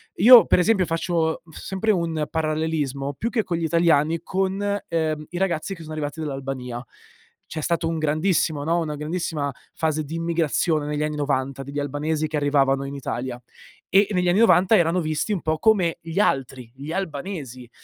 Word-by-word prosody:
Io, 235 +4 +9
per - - +3
esempio, 190 0 +3
faccio 165 -1 -1
sempre 190 +6 -2
un 165 -5 -1
parallelismo 155 -3 -1
più 225 - -3
che 230 -3 0
con 170 - -2
gli 165 - -1
italiani, 165 -1 +2
con, 195 +2 -1
ehm, 155 -2 -1
i 175 - -6
ragazzi 190 0 -1
che 165 - -13
sono 155 - -9
arrivati 155 0 -4
dall'Albania. 135 -4 -5 0.6
C'è 160 - -6
stato 165 +1 0
un 165 - -2
grandissimo 155 -1 +1
no, 165 +3 +1
una 155 -3 -3
grandissima 150 -1 -3 0.2
fase 155 -2 -1
di 160 - -6
immigrazione 165 -2 0
negli 150 0 -2
anni 150 0 -2
'90, 135 -1 -1
degli 140 +2 -5
albanesi 150 +2 -1
che 150 0 -2
arrivavano 140 -1 +2
in 140 - -6
Italia; 125 -2 -4 0.5
e 195 +2 +5
negli 180 -2 +1
anni 180 +4 +3
'90 215 -1 +5
erano 175 0 +2
visti 155 +6 -1
un 185 - -2
po' 155 0 0
come 185 -4 +3
gli 165 +2 -8
altri, 130 - 0
gli 140 +5 -7
albanesi. 145 - -5
160 Hz, 175 wpm, -23 LUFS, 145-175 Hz, 0.6 s, Io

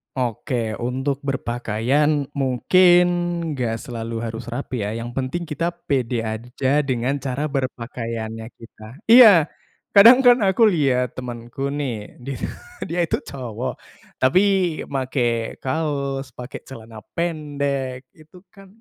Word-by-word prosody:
Oke, 120 -2 -2
untuk 135 +3 -2
berpakaian 135 +3 0
mungkin 175 +7 +4 0.5
nggak 115 -3 -2
selalu 115 -1 -5
harus 115 0 -5
rapi 125 -2 -4
ya, 105 - -2
yang 120 +1 -7
penting 135 +6 -3
kita 165 +4 -2 0.2
pede 125 -4 0
aja 125 +6 -1
dengan 130 0 -1
cara 140 +2 -3
berpakaiannya 115 -4 -4 0.2
kita 115 +3 -13
iya, 220 -9 +8 0.5
kadang 230 +6 +9
kan 245 -3 +5
aku 200 +4 +4
liat 130 - +1
temanku 125 +2 -5
nih, 130 -8 -5
di 135 +2 -5 0.5
dia 175 +2 -2
itu - - -2
cowok, 125 -1 -5 0.4
tapi 130 +9 +4 0.5
make 125 -4 -1
kaos, 140 -3 -2
pake 125 +1 -8
celana 115 -4 -10 0.2
pendek, 140 -6 -2
itu 160 +3 -18
kan 195 0 -16
130 Hz, 120 wpm, -22 LUFS, 120-150 Hz, 0.5 s, kadang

